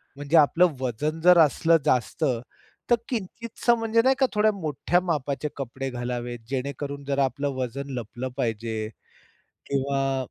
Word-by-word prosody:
म्हणजे 145 +3 +1
आपलं 165 +3 +5
वजन 140 +6 -2
जर 180 +1 +7
असलं 165 +2 +5
जास्त, 125 +6 +1 0.7
तर 240 - +6
किंचितसं 235 +1 -1
म्हणजे 225 0 +2
नाही 265 +1 +4
का 270 - +5
थोड्या 215 +1 +4
मोठ्या 170 -2 0
मापाचे 150 -4 -2
कपडे 135 0 -4
घालावेत 120 -1 -4
जेणेकरून 140 +1 -4
जर 140 0 -1
आपलं 140 +2 -1
वजन 130 +2 -4
लपलं 120 +3 -6
पाहिजे. 110 -3 -2 0.8
किंवा 135 -1 0
140 Hz, 135 wpm, -25 LUFS, 130-170 Hz, 0.8 s, जर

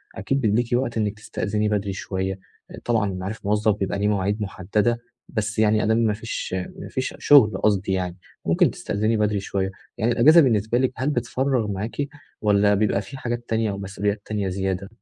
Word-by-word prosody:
أكيد 135 +7 -1
بيبقى 105 -2 +2
ليكِ 120 -1 0
وقت 120 -2 0
إنِّك 105 -1 -1
تستأذني 105 0 -2
بدري 100 -2 -1
شوية، 95 0 -3 0.5
طبعًا 110 -5 +1
معروف 95 +4 -5
الموظف 105 0 +2
بيبقى 100 0 -2
ليه 105 - +1
مواعيد 105 +1 0
مُحددة، 105 +4 0 0.3
بس 110 -1 -2
يعني 110 0 +3
أدام 110 +1 +2
ما 110 -2 +2
فيش 110 -2 -5 0.3
ما - - -7
فيش 130 0 -3
شُغل 110 -9 +6
قصدي 100 -2 +1
يعني، 90 -1 -2 0.3
ممكن - - +3
تستأذني 110 +2 -1
بدري 105 -1 +1
شوية، 95 0 -2 0.3
يعني 115 +3 +1
الإجازة 155 +8 +7
بالنسبة 115 -3 +2
لكِ 130 0 +2
هل 130 +3 -1
بتفرّغ 125 -2 0
معاكِ، 110 +9 -3 0.3
والّا 105 -1 +4
بيبقى 105 -1 +1
في 135 +7 -9
حاجات 120 -1 -4
تانية 110 -2 +1
أو 100 - -5
مسؤوليات 100 +1 -2
تانية 105 -3 -2
زيادة؟ 95 0 -2
105 Hz, 180 wpm, -23 LUFS, 100-115 Hz, 0.5 s, الإجازة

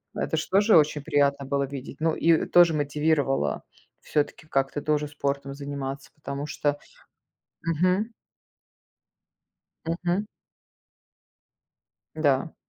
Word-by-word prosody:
Это - - -1
ж - - -1
тоже 205 +1 +5
очень 150 -1 +2
приятно 140 -1 +1
было 140 +1 0
видеть. 135 0 -8
Ну 160 0 +1
и 165 -1 +3
тоже 175 -2 +6
мотивировало 145 - 0 0.4
всё-таки 150 +1 -2
как-то 135 0 0
тоже 150 0 0
спортом 140 -1 -3
заниматься, 140 -1 -6
потому 140 -1 -5
что 145 -1 -1 0.9
мгм. 180 +7 +1 1.7
Мгм. 175 +4 -1 1.9
Да. 150 0 +1
145 Hz, 100 wpm, -26 LUFS, 140-165 Hz, 1.9 s, тоже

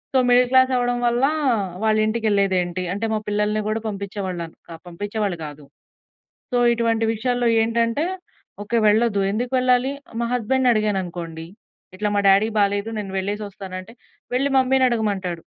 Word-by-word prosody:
So, - - +6
middle 245 0 +5
class 260 0 +4
అవ్వడం 245 0 +1
వల్లా, 240 +3 +2 0.5
వాళ్ళ 220 -1 +3
ఇంటికెళ్ళేదేంటి? 200 -5 0
అంటే, 205 +3 -2
మా - - +1
పిల్లల్ని 210 +1 0
గూడా 215 +1 -1
పంపిచ్చేవాళ్ళన్ 195 -5 -4
క 165 - -9
పంపిచ్చేవాళ్ళు 205 +1 -3
గాదు. 150 -1 -9 0.9
సో, - - +1 0.2
ఇటువంటి 230 -1 +1
విషయాల్లో 245 +2 0
ఏంటంటే, 230 +5 0 0.6
ఓకే. 230 +3 0
వెళ్ళద్దు. 215 -1 +2
ఎందుకు 240 +5 -2
వెళ్ళాలి? 255 +1 +2 0.3
మా 235 - -1
హస్బెండ్‌ని 250 +1 +2
అడిగాననుకోండి, 175 -6 -2 0.5
ఇట్లా 210 +2 -1
మా 205 - +2
డ్యాడీ‌కి 205 +3 +4
బాలేదు. 200 +2 +1
నేను 195 -2 -7
వెళ్ళేసొస్తాను 200 -1 -5
అంటే, 210 +5 -14 0.4
వెళ్ళి 275 +3 +2
మమ్మీ‌నడగమంటాడు. 220 -10 +1
215 Hz, 135 wpm, -22 LUFS, 195-240 Hz, 0.9 s, సో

